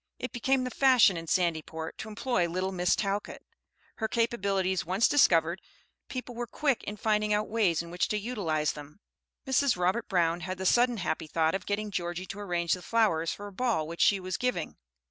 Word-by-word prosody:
It 250 - -5
became 260 +1 +1
the 255 - -3
fashion 250 -7 +5
in 165 0 -6
Sandyport 160 -2 -1
to 220 - -6
employ 210 -5 0
"little 185 +3 -2
Miss 180 -1 +2
Talcott." 200 0 -3 0.5
Her 220 - -1
capabilities 195 -6 0
once 190 +8 +2
discovered, 170 - +3 0.5
people 250 -1 -5
were 240 0 -4
quick 275 0 0
in 210 - -5
finding 210 0 +1
out 210 +1 -1
ways 195 -8 +1
in 170 - -10
which 175 - 0
to 210 - -1
utilize 195 -9 -1
them. 150 +4 -11 0.5
Mrs. 265 -3 +2
Robert 185 +6 0
Brown 170 -2 +2
had 185 +2 -5
the 190 - -5
sudden 240 +4 +3
happy 165 -4 -2
thought 160 +1 +1
of 195 - -4
getting 205 +1 -2
Georgie 175 0 -3
to 195 - -8
arrange 175 -4 0
the 180 - -3
flowers 180 -8 +1
for 205 - -7
a 205 - -9
ball 215 -8 0
which 170 +1 -5
she 200 - +4
was 185 -1 -4
giving. 245 -10 -2
195 Hz, 195 wpm, -29 LUFS, 170-230 Hz, 0.5 s, fashion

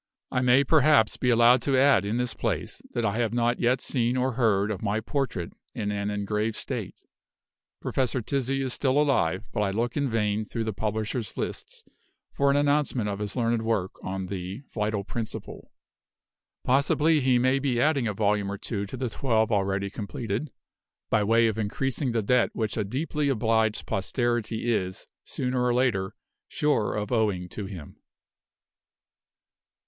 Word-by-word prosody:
I 125 - +1
may 125 +2 +5
perhaps 150 -6 +4
be 125 - 0
allowed 120 +1 +6
to 135 -2 +1
add 135 -5 +5
in 105 +3 -1
this 125 -2 -1
place, - - -3
that 120 - 0
I 105 0 0
have 115 -2 0
not 120 0 +1
yet 125 +2 +2
seen 125 -1 0
or 130 +1 +1
heard 110 -4 +2
of 100 - -4
my 105 0 0
portrait 110 - -3 0.2
in 105 -2 -2
an 100 0 -2
engraved 105 +2 -1
state. - - -5 0.8
Professor 130 -1 0
Tizzi 135 +2 -1
is 130 -2 -1
still 135 0 +1
alive; 130 - +2
but - - -2
I 100 - +1
look 115 +4 -1
in 140 -2 0
vain 105 -2 0
through 115 +2 -4
the 110 -1 -2
publishers' 110 +2 -3
lists - - -5 0.5
for 140 0 +2
an 140 - +3
announcement 145 -6 +1
of 100 0 -4
his 105 -1 -4
learned 115 -2 +1
work 110 -5 0
on 95 0 -3
the 95 +5 -6
Vital 105 -2 -1
Principle. 110 +2 -6 0.9
Possibly 150 +4 +3
he 130 -2 +3
may 130 +2 +2
be 130 -3 0
adding 140 -4 +2
a 105 - -1
volume 105 -1 +1
or 100 - -4
two 100 -1 -4
to - - -7
the 130 - -2
twelve 115 -2 +1
already 100 -1 0
completed, 110 +5 -4 0.6
by 110 -2 +3
way 115 +2 +4
of 110 -1 0
increasing 130 +5 -1
the 115 -2 0
debt 125 +4 +3
which 110 -2 -2
a 110 - 0
deeply 145 +6 -1
obliged 110 -3 +1
posterity 120 +2 -1
is, 95 -3 -3 0.2
sooner 125 -1 -1
or 125 -1 +2
later, 115 -7 +1 0.3
sure 145 -8 0
of 105 +2 -3
owing 105 -6 +1
to 100 +1 -6
him. 90 -7 -9
115 Hz, 170 wpm, -26 LUFS, 105-130 Hz, 0.9 s, allowed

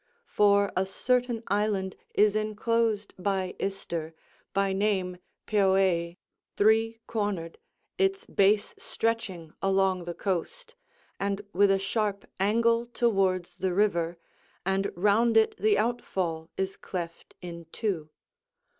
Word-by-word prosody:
For 200 -1 +3
a 190 +1 +1
certain 245 +3 0
island 200 -2 0 0.2
is 210 0 +4
enclosed 215 0 0
by 190 -1 -1
Ister, 170 -5 -4 0.4
by 195 0 +1
name 190 -2 0 0.3
Peuee, 190 -4 +2 0.4
three 225 +2 +3
cornered, 205 -7 -3 0.4
its 390 +3 +1
base 205 +1 +2
stretching 195 -8 -2
along 190 -2 +2
the 175 -1 -5
coast, 465 - -3 0.5
and 200 0 -1
with 200 +2 +4
a 195 - +4
sharp 200 0 -1
angle 230 +4 +2
towards 190 -7 +1
the 185 -1 -1
river; 175 -5 +1 0.5
and 195 +1 0
round 215 +5 +3
it 220 - +4
the 210 -1 +3
outfall 185 -8 -1
is 190 0 -2
cleft 170 -3 -6
in 170 -2 -8
two. 180 -9 -2
200 Hz, 115 wpm, -28 LUFS, 185-215 Hz, 0.5 s, is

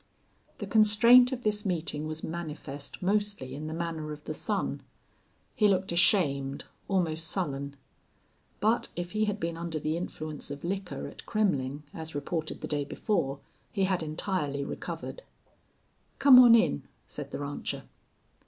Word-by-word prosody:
The - - -5
constraint 230 +4 +6
of 250 -1 -4
this 210 -1 0
meeting 155 -5 -2
was 155 0 -5
manifest 155 -3 -6
mostly 200 -9 0
in 150 +3 -5
the 155 - -4
manner 165 -2 -3
of 150 0 -8
the - - -4
son. - - -1 0.7
He 210 - +4
looked 190 -2 +1
ashamed, 140 -6 +3 0.2
almost 165 -4 0
sullen. 140 -7 -2 0.8
But 220 +3 +2
if 175 0 -4
he 215 0 +1
had 205 0 -2
been 165 -2 -2
under 170 -1 -3
the 155 +2 -1
influence 155 -3 -5
of 145 0 -7
liquor 190 +1 -3
at - - -12
Kremmling, 145 - 0
as 160 -2 -7
reported 155 +2 -3
the - - -4
day 145 -1 0
before, 140 - -1 0.3
he 195 - 0
had 185 -2 +1
entirely 155 -3 -2
recovered. - - -6 1.0
"Come 270 -3 +9
on 240 -2 +9
in," 75 - +3 0.2
said - - -7
the - - -5
rancher. 145 0 -4
170 Hz, 150 wpm, -29 LUFS, 150-205 Hz, 1.0 s, Come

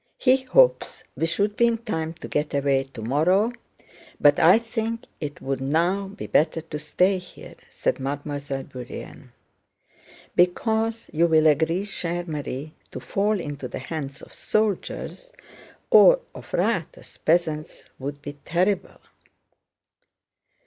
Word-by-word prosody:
He 255 0 +4
hopes - - +3
we 165 - 0
should 205 +5 0
be 235 - +4
in 230 -1 +1
time 165 -9 -3
to 170 - -9
get 150 0 -1
away 140 -1 +2
tomorrow, 155 - +1 0.7
but - - +5
I - - +7
think 230 0 -3 0.2
it 145 -2 -6
would 135 -1 -2
now 170 +8 +1
be 200 +2 -8
better 155 +2 +2
to 155 -1 -7
stay 185 +5 +2
here," 180 - -13 0.2
said - - -1
Mademoiselle 140 0 -4
Bourienne. 125 -3 -9 1.0
"Because, 220 +5 +1
you 165 +2 +3
will 160 -1 +4
agree, 160 +5 +3
chère 175 -3 -3
Marie, 150 -1 -5 0.2
to - - -7
fall 205 +1 0
into 145 -5 -5
the - - -6
hands 140 0 -6
of - - -12
the - - -17
soldiers 215 - -2 0.6
or - - +8
of - - -12
riotous - - -2
peasants 155 -2 0
would 140 +2 -6
be 145 -1 -8
terrible." 185 +3 0
165 Hz, 135 wpm, -24 LUFS, 145-205 Hz, 1.0 s, or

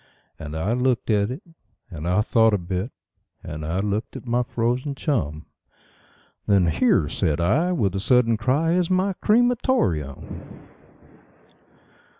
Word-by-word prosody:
And 80 -1 -6
I 95 +8 0
looked 125 -1 0
at 100 0 +2
it, 130 +9 -6 0.5
and 80 -1 -6
I 90 +4 +3
thought 110 0 +3
a - - +1
bit, 90 +6 -4 0.5
and 75 +1 -6
I 85 +5 -1
looked 105 +2 -3
at - - -8
my 120 0 +1
frozen 125 +3 -1
chum; 80 - -2 1.0
Then 100 -3 +4
"Here", 80 -2 +2
said 80 -1 -1
I, 135 - +2
with 100 - 0
a 95 - -2
sudden 120 +1 +3
cry, 130 +9 +1
"is 180 -1 +1
my 190 +1 +1
cre 210 +3 +1
ma 245 0 +3
tor 190 - +2
eum." 70 -3 -9
110 Hz, 150 wpm, -23 LUFS, 90-130 Hz, 1.0 s, Then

